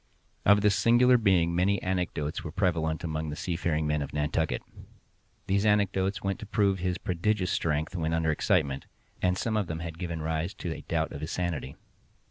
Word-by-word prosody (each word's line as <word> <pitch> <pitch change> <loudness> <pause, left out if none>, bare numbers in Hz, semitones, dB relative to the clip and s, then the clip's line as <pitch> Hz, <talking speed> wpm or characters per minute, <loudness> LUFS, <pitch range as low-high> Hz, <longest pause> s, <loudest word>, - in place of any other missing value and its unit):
Of 100 +1 +6
this 105 -1 +4
singular 125 +2 +5
being 95 -7 +3
many 95 +3 +2
anecdotes 90 -5 -2
were 80 - -5
prevalent 80 -3 0
among 80 -1 -2
the 75 - -4
seafaring 85 -3 -1
men 75 0 0
of 70 - -5
Nantucket. 75 +2 0 0.8
These 100 +1 +1
anecdotes 100 -2 +1
went 100 0 -1
to 110 - -8
prove 100 -3 +2
his 90 0 -1
prodigious 90 +1 0
strength 80 +2 -1
when 80 -2 -1
under 80 -1 +1
excitement, 70 -2 0 0.3
and 90 0 +2
some 110 +2 -1
of 105 -4 0
them 80 0 -4
had 85 -1 -6
given 85 -3 -3
rise 80 +4 -2
to 85 -4 -4
a - - -8
doubt - - -1
of 70 - -7
his 75 - -4
sanity. 85 -7 -3
85 Hz, 185 wpm, -28 LUFS, 80-100 Hz, 0.8 s, Of